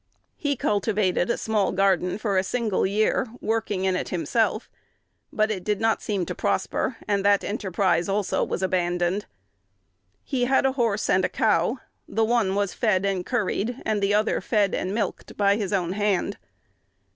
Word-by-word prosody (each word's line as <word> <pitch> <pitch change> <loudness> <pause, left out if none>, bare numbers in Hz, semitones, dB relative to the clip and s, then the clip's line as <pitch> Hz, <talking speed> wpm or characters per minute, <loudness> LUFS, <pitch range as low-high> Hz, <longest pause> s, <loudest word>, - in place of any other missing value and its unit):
He 290 -2 -1
cultivated 205 -5 0
a - - +1
small 215 -3 0
garden 190 -1 +1
for 215 -2 -1
a 185 - +3
single 220 -2 0
year, 215 +6 +1
working 215 -4 -1
in 190 -1 +2
it - - -3
himself; 215 +5 0 0.6
but 215 0 +1
it 190 -4 -4
did 210 0 -1
not 225 0 +1
seem 200 -4 -1
to - - -4
prosper, 230 - -1
and 200 -1 +1
that 200 0 +4
enterprise 190 -3 0
also 200 0 0
was 190 - -3
abandoned. 175 +1 0 1.0
He 250 -3 0
had 265 +1 +3
a 265 - +3
horse 230 -6 0
and 185 - +3
a - - +1
cow: 215 +2 +1 0.3
the 225 0 +1
one 220 -4 +1
was 200 -2 0
fed 200 -5 +1
and 195 -2 0
curried, 235 +2 -1
and 215 -2 0
the 200 +1 +2
other 215 +1 +1
fed 205 -4 +1
and 185 - -2
milked, 205 -2 -3
by 200 -1 +4
his 205 -2 -3
own 180 -4 0
hand. 200 -1 0
205 Hz, 170 wpm, -25 LUFS, 190-220 Hz, 1.0 s, that